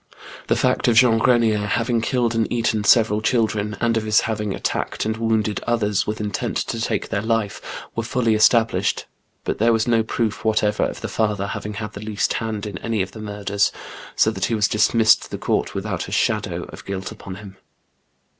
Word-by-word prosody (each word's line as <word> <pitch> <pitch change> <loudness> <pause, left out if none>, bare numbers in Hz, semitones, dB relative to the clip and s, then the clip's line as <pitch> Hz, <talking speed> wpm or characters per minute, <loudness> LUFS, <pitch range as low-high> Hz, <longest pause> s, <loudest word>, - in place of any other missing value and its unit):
The - - +2
fact - - +1
of 120 - +4
Jean 120 -1 +5
Grenier 115 -3 +3
having 115 +3 0
killed 120 -1 0
and 115 -1 0
eaten 115 -3 0
several 110 -1 +4
children, 110 -3 0
and 115 -1 +1
of 110 - -1
his 110 -1 +3
having 105 -2 -2
attacked - - -2
and 110 0 -1
wounded 110 -2 0
others, 105 -5 +1
with 110 +1 -3
intent 105 -1 -2
to 115 - -3
take - - -2
their 100 -2 -1
life, 110 -2 -1 0.3
were 115 - 0
folly 115 0 0
esta 110 +1 +5
blished; 95 -3 -1 0.4
but - - -3
there 115 +2 +4
was 110 0 +1
no 115 -1 +3
proof 110 -1 -2
whatever 105 -1 +1
of - - -5
the - - -3
father 105 -3 -1
having 105 +1 -5
had 105 0 -5
the 100 - -8
least 105 -2 -1
hand 110 -2 -3
in 100 -4 -6
any 110 -4 -1
of 95 - -8
the 110 - -9
murders, 100 -1 -1 0.4
so - - +3
that - - -2
he 115 - 0
was 105 -2 +2
dismissed 110 +1 +3
the - - -5
court - - -1
without - - -3
a - - -9
shadow - - 0
of - - -10
guilt 95 -1 -5
upon 95 - -9
him. 95 -1 -11
110 Hz, 200 wpm, -22 LUFS, 105-115 Hz, 0.4 s, Jean